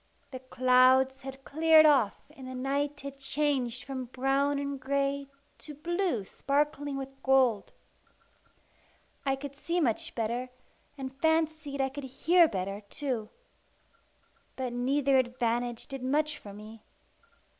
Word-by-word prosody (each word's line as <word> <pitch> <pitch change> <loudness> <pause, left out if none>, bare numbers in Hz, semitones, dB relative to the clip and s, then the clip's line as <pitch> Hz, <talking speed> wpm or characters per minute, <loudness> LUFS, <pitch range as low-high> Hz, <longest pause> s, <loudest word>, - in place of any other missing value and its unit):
The 260 - -6
clouds 255 +1 +4
had 270 0 -9
cleared 315 +1 +6
off, 265 -9 +3
and 260 -1 -10
the 255 - -6
night 280 +3 -2
had 275 0 -8
changed 270 -3 -1
from 260 -1 -5
brown 270 +3 0
and 280 -1 -3
grey 280 +1 -1 0.3
to 300 - -9
blue 345 - -1
sparkling 285 +5 -1
with 270 0 -8
gold. 260 -6 +3 1.6
I 270 - +3
could 280 +1 -8
see 340 +5 -2
much 240 -9 -1
better, 235 +2 -2 0.5
and 265 -1 -6
fancied 315 -3 +1
I 270 - +1
could 275 +1 -7
hear 335 +6 +4
better 195 -2 -4
too. 250 -7 -3 1.3
But 255 -2 -3
neither 265 +2 +2
advantage 240 -1 -1
did 270 -1 -7
much 300 +4 0
for 205 - -10
me. 215 +2 -11
270 Hz, 130 wpm, -29 LUFS, 255-285 Hz, 1.6 s, cleared